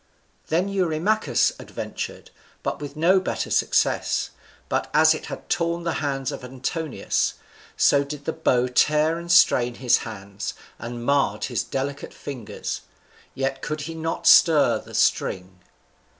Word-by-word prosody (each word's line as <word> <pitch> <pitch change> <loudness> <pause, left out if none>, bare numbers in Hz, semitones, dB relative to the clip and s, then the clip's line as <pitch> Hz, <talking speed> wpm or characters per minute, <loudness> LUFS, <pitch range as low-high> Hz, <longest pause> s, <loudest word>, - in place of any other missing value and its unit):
Then 175 +4 +1
Eurymachus 195 +2 +1
adventured, - - -6 0.3
but - - -3
with 145 0 -7
no 175 +5 +4
better 185 - -3
success; - - +1 0.4
but - - -1
as 155 +1 +6
it 155 - -6
had - - -8
torn 170 0 -1
the 170 -1 -1
hands 135 -2 -2
of 135 - -7
Antinous, 130 +5 -2 0.4
so 140 0 +4
did 145 0 -8
the 160 - -1
bow 125 -6 +2
tear 150 +5 +2
and 170 0 -5
strain 125 -8 +5
his 125 -1 +3
hands, 100 -2 -7 0.2
and 120 0 -6
marred 140 +1 +1
his - - -1
delicate 140 +1 -4
fingers, 115 -7 -6 0.5
yet 135 0 -2
could 155 0 -3
he 165 +2 -5
not 165 0 -3
once - - +5
stir 160 -4 +5
the - - -11
string. 90 0 0
145 Hz, 145 wpm, -24 LUFS, 125-165 Hz, 0.5 s, as